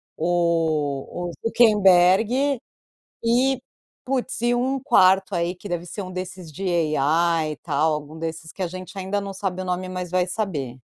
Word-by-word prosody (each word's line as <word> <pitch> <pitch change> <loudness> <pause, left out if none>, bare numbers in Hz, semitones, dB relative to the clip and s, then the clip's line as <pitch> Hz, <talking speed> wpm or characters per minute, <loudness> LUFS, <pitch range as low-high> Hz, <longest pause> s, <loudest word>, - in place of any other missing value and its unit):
o 165 -2 0
o - - -5
Zuckerberg 220 +4 +4 0.6
e, 255 +3 +2 0.4
putz, 260 -2 -2
e 240 +1 +2
um 260 +2 0
quarto 190 -4 +4
aí 175 +1 0
que 190 +3 -10
deve 175 -1 -3
ser 205 - -6
um 185 - -7
desses 185 -2 -6
de 185 +6 -7 0.3
AI 160 +2 +2
e - - -7
tal, 155 +1 0
algum 150 +1 -5
desses 160 0 -5
que 190 - -6
a - - +1
gente 185 +2 -8
ainda 195 +2 -1
não 200 0 -5
sabe 185 -1 -3
o - - -6
nome, 180 0 -2
mas 180 -1 -5
vai 180 -1 +1
saber. 160 - -3
180 Hz, 170 wpm, -23 LUFS, 165-205 Hz, 0.6 s, Zuckerberg